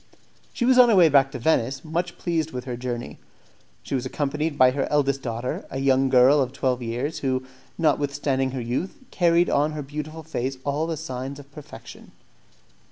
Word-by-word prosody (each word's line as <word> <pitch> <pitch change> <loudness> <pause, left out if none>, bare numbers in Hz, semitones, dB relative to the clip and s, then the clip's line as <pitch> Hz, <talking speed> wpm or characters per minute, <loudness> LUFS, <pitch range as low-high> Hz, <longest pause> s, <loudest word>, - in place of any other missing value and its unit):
She 240 - -2
was 255 0 +5
on 245 -1 +8
her 220 - +4
way 175 -4 +6
back 135 -2 +4
to 135 - -5
Venice, 135 0 0
much 175 +3 -3
pleased 165 -3 -1
with 125 -4 -6
her 125 -2 -4
journey. 120 -10 -5 0.6
She - - -7
was 130 -2 0
accompanied 145 +3 -2
by 130 0 +6
her 135 +1 -2
eldest 140 -2 +1
daughter 120 +1 -4
a 135 - -5
young 135 0 +2
girl 130 +3 +5
of 130 -2 -1
twelve 130 -2 -1
years, 125 +6 -3
who, 130 -1 -1 0.3
notwithstanding 145 -3 0
her 130 -1 -4
youth, 125 +11 -3
carried 175 -1 +3
on 150 +2 +1
her 150 -1 -5
beautiful 150 +3 -7
face 135 -4 -3
all 145 +3 -1
the 165 -1 -3
signs 130 +1 -6
of 145 -1 -14
perfection. 145 0 -12
140 Hz, 185 wpm, -24 LUFS, 130-155 Hz, 0.6 s, on